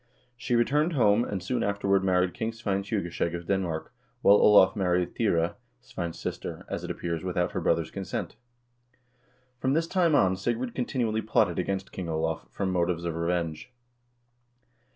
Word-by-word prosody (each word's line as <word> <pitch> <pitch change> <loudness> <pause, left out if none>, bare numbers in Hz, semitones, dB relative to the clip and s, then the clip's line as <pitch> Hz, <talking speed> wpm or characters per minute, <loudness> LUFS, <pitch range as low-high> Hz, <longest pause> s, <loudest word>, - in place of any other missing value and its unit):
She 120 +1 -1
returned 150 +8 +2
home, 115 -5 +4
and 100 -6 -4
soon 125 +6 -1
afterward 100 -1 +1
married 90 -1 +2
King 110 +1 -3
Svein 105 -4 -1
Tjugeskjeg 90 -4 -2
of 85 0 -6
Denmark, 90 -5 -2 0.3
while 100 - +7
Olav 100 -3 +6
married 90 -3 0
Thyre, 85 -7 +1 0.2
Svein's 85 -9 -6
sister, - - -5
as - - -4
it - - -5
appears, 85 -2 -3
without 90 -1 -1
her - - -3
brother's - - +1
consent. - - -4 1.2
From 130 +2 +1
this 165 +2 +2
time 170 -3 +2
on 95 -8 +4
Sigrid 120 +4 -2
continually 120 -3 -1
plotted 110 - +1
against 95 0 -2
King 90 -3 -5
Olav, 80 -4 -2
from 95 +9 -2
motives 85 -1 0
of 85 - -1
revenge. 85 +2 -2
95 Hz, 155 wpm, -27 LUFS, 85-115 Hz, 1.2 s, while